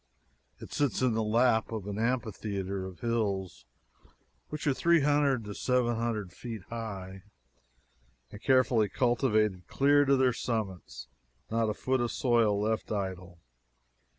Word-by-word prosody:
It - - -11
sits 145 -3 0
in 125 -3 +3
the 110 - 0
lap 115 +1 +2
of 110 -4 -4
an 105 +1 -4
amphitheater 100 -5 -2
of 95 +3 -12
hills 105 -6 -2 0.8
which 150 +1 -5
are 145 - +3
three 170 +3 +3
hundred 140 -4 +2
to 105 - -6
seven 125 +1 +1
hundred 110 -6 -3
feet 115 -3 -7
high, 95 -5 -6 1.1
and 105 - -10
carefully 125 -5 +3
cultivated 110 -7 +1
clear 145 +1 +4
to 140 0 +4
their 130 -1 +3
summits 100 - -4 0.4
not 115 -1 +1
a 105 - -2
foot 130 +1 0
of 120 -1 -1
soil 115 -5 +2
left 110 +1 -1
idle. 95 -3 -4
115 Hz, 140 wpm, -30 LUFS, 100-125 Hz, 1.1 s, clear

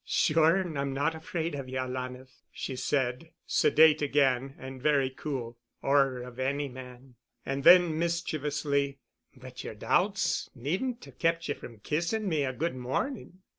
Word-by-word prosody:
"Sure 160 +2 +3
and 175 -7 -2
I'm 140 -1 -1
not 140 +4 +1
afraid 160 0 -4
of 135 -2 -5
you, 130 - -4
alanah," 130 0 -4 0.3
she 135 - -5
said, 130 +3 -1 0.2
sedate 155 -1 +5
again 135 -2 +1
and 130 0 -9
very 140 -2 +2
cool, 125 -5 -5 0.2
"or 135 -2 +3
of 125 0 -10
any 140 +2 0
man," 125 0 -11 0.3
and 135 0 -2
then, 175 -2 +7
mischievously, 150 -4 -1 0.4
"But 130 -1 -10
your - - -6
doubts 180 - +1
needn't 190 - -3
have - - -16
kept 165 0 +1
you - - +2
from 115 -6 -12
kissing 170 - -1
me 155 -5 +1
a 130 - -1
good 160 +4 -2
morning." 185 - -4
140 Hz, 155 wpm, -29 LUFS, 130-160 Hz, 0.4 s, then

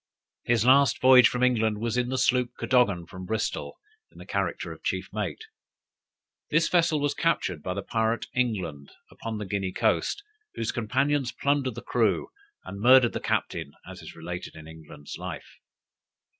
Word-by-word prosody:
His 115 -2 +2
last 135 -1 +5
voyage 130 -1 +7
from 125 0 -2
England 110 -4 +2
was 115 0 -2
in 125 0 0
the 130 - -1
sloop 125 -1 +1
Cadogan 105 -9 +2
from 90 +1 -10
Bristol, 110 +2 -3 0.3
in - - -20
the - - -11
character - - -2
of - - -11
chief - - -2
mate. 440 - -4 1.1
This 165 0 +3
vessel 165 -3 +2
was 145 0 0
captured 95 - 0
by 90 +4 -4
the 100 - -4
pirate 115 +1 -1
England, 95 - -2 0.2
upon 115 -1 -6
the 105 - -5
Guinea 95 -1 -2
coast, 405 - 0 0.3
whose 115 - -2
companions 130 +3 0
plundered 140 -4 0
the - - -8
crew, 115 -5 +1 0.4
and 100 - -8
murdered 125 0 +6
the - - -2
captain, 70 - -2
as - - -10
is - - -11
related 85 +2 -7
in 80 -1 -11
England's 75 -2 -11
life. - - -8
115 Hz, 165 wpm, -26 LUFS, 95-130 Hz, 1.1 s, voyage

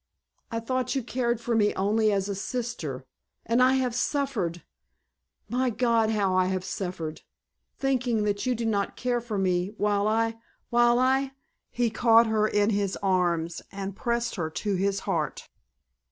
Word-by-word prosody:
I 230 - -2
thought 255 +3 -1
you 265 - 0
cared 240 -1 -1
for 235 0 -1
me 210 -2 +2
only 215 +2 +2
as 195 -1 0
a 200 - -2
sister, 195 - -4 0.4
and 230 +3 +2
I 255 +1 +5
have 255 -2 0
suffered—my 250 - -4
God, 230 -1 +2
how 205 -4 +1
I 185 0 +3
have 185 -1 -2
suffered—thinking 215 - -3
that 205 +3 -1
you 250 - +2
did 230 0 -2
not 200 -2 0
care 245 -1 -1
for 225 -3 -4
me, 185 +1 0
while 205 0 +1
I—while 230 +2 +1
I——" 265 +1 +2 0.4
He 240 -2 0
caught 230 0 +5
her 215 -1 +2
in 205 0 +2
his 200 -2 0
arms 175 -3 +1
and 195 -1 -5
pressed 235 0 -1
her 160 -3 -1
to 200 +6 -2
his 195 +1 0
heart. - - -2
220 Hz, 155 wpm, -27 LUFS, 195-240 Hz, 0.4 s, I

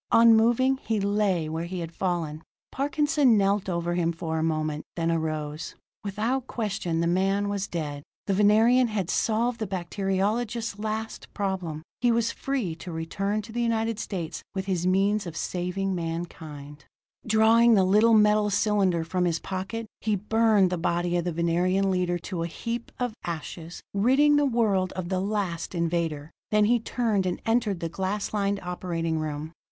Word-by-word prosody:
Unmoving, 235 +3 +5
he 225 -4 -2
lay 200 -5 +1
where 160 +2 -3
he 185 +2 -5
had 165 -1 -5
fallen. 165 -4 -2 0.3
Parkinson 290 -3 +2
knelt 195 0 +1
over 170 -1 -1
him 170 -1 +1
for 160 -1 -3
a - - 0
moment, 155 -2 -1
then 165 -1 0
arose. 155 -2 -3 0.3
Without 230 +6 -1
question, 195 -7 -2
the - - +1
man 195 +3 +1
was 200 -1 -2
dead. 150 -4 -4 0.2
The 200 - 0
Venerian 220 +5 +5
had 200 -5 -2
solved 230 +2 +1
the 215 - -2
bacteriologist's 200 +5 -1
last 220 +1 -4
problem; 185 -6 -3 0.2
he 245 0 +3
was 230 0 +1
free 260 -11 -2
to 175 +1 -8
return 195 +6 -2
to 220 - -10
the 240 +2 -2
United 225 -1 0
States 170 -6 -4
with 190 0 -2
his 180 -2 -1
means 200 +2 +2
of 160 -1 -7
saving 185 +2 -2
mankind. 160 -4 -6 0.4
Drawing 225 +2 +5
the 195 - +4
little 215 +4 +5
metal 210 0 +4
cylinder 195 -4 +2
from 180 +2 -1
his 170 -2 +1
pocket, 195 +6 -4
he 215 -1 0
burned 210 -1 +3
the 180 - -1
body 175 +1 0
of 175 -1 0
the 175 - 0
Venerian 175 +4 +1
leader 180 -1 0
to 175 0 -5
a 165 - -1
heap 230 +7 -5
of 245 -2 -1
ashes, 170 0 -6
ridding 265 +9 +4
the 290 -1 +3
world 210 -7 +1
of 185 -2 -4
the 185 -1 0
last 195 -4 -2
invader. 165 -3 -1 0.2
Then 210 0 +4
he 240 +2 +3
turned 220 -4 0
and 180 - -2
entered 225 -5 +1
the 165 - -1
glass 190 +5 -3
lined 200 -1 0
operating 170 -2 -2
room. 155 0 -4
195 Hz, 170 wpm, -26 LUFS, 170-220 Hz, 0.4 s, Unmoving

